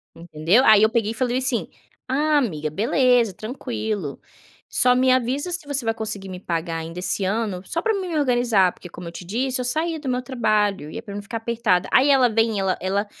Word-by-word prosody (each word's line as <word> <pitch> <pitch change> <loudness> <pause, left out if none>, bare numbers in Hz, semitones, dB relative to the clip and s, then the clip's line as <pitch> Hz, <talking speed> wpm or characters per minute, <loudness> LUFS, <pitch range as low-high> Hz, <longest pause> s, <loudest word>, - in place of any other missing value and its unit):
Entendeu. 170 +7 +1
Aí 215 -3 +7
eu 220 - +5
peguei 225 -2 0
e - - -4
falei 245 +1 -1
assim: 255 -2 0 0.4
"Ah 295 +3 +2
amiga 160 - -1
beleza 235 - +2
tranquilo, 215 - -4 0.5
só 250 0 +3
me 255 +1 +3
avisa 260 +6 0
se 345 -4 -3
você 285 -2 -1
vai 225 0 0
conseguir 210 -3 -5
me 185 -1 -7
pagar 165 -2 -3
ainda 165 +2 -6
esse 190 +2 0
ano 200 -2 -1
só 335 - -2
para 445 - +1
mim 385 -3 -3
me 330 -3 -2
organizar, 240 -9 +3
porque 180 - -12
como 175 +1 -9
eu - - -11
te 175 - -9
disse 255 +7 -1
eu 250 - -2
saí 315 +6 -1
do 295 - -8
meu 250 0 0
trabalho, 215 - 0
ia 230 - -6
para 205 - -9
não 205 - -4
ficar 205 +3 -5
apertada", 225 -5 0
aí 270 +2 +5
ela 265 -3 +5
vem, 225 -1 +1
ela 190 -1 0
ela 195 +3 -1
225 Hz, 220 wpm, -22 LUFS, 190-255 Hz, 0.5 s, Aí